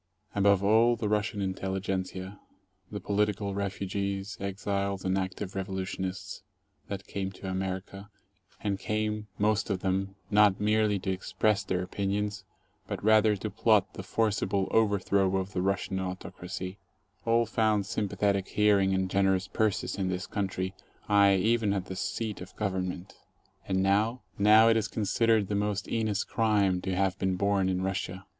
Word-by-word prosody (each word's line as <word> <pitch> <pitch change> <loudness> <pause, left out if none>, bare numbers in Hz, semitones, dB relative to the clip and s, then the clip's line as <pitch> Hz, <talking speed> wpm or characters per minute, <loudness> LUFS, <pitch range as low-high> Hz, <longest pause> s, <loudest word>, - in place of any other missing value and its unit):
Above 100 -1 +3
all, 115 +4 +5
the 110 -2 -2
Russian 105 0 0
intelligentzia, 95 0 -3 0.5
the 105 - -4
political 100 0 0
refugees, 100 0 -3
exiles, 100 0 -2
and 95 0 +1
active 95 +1 -3
revolutionists 95 -1 -4 0.5
that 100 -1 -5
came 95 -1 -4
to 95 - -9
America, 95 +1 -4 0.5
and 100 -2 -1
came 105 0 -2
— - - -37
most 105 +1 +1
of 95 -3 -1
them 95 0 -1
— - - -33
not 105 -2 +5
merely 105 0 +2
to 95 0 -2
express 105 +3 0
their 90 -2 -1
opinions 100 +2 -2 0.4
but 100 -3 -5
rather 110 0 +5
to 105 +2 -5
plot 105 -2 +3
the - - -6
forcible 100 -1 0
overthrow 100 -3 +2
of 95 +2 -3
the 90 - 0
Russian 95 0 -1
autocracy, 90 0 -6 0.4
all 115 +1 +3
found 110 -2 +1
sympa 100 0 -3
thetic 100 -2 +1
hearing 100 -2 +3
and 95 0 0
generous 95 0 +2
purses 105 -1 -1
in 95 -1 0
this 90 0 -2
country, 95 -1 -3 0.3
aye, 100 -1 +5
even 110 +1 +2
at 95 -2 -2
the 95 - -6
seat 105 +3 -3
of 90 - -10
Government. 95 -2 -3 0.5
And 95 0 +1
now? 105 +5 +1 0.2
Now 110 +2 +7
it 115 0 +5
is 110 0 0
considered 110 0 +1
the 105 - -3
most 105 0 -1
heinous 110 -3 0
crime 100 -5 +1
to 95 0 -2
have 95 0 0
been 95 -1 +1
born 100 0 +1
in 95 0 -1
Russia. 95 0 -3
100 Hz, 155 wpm, -29 LUFS, 95-105 Hz, 0.5 s, Now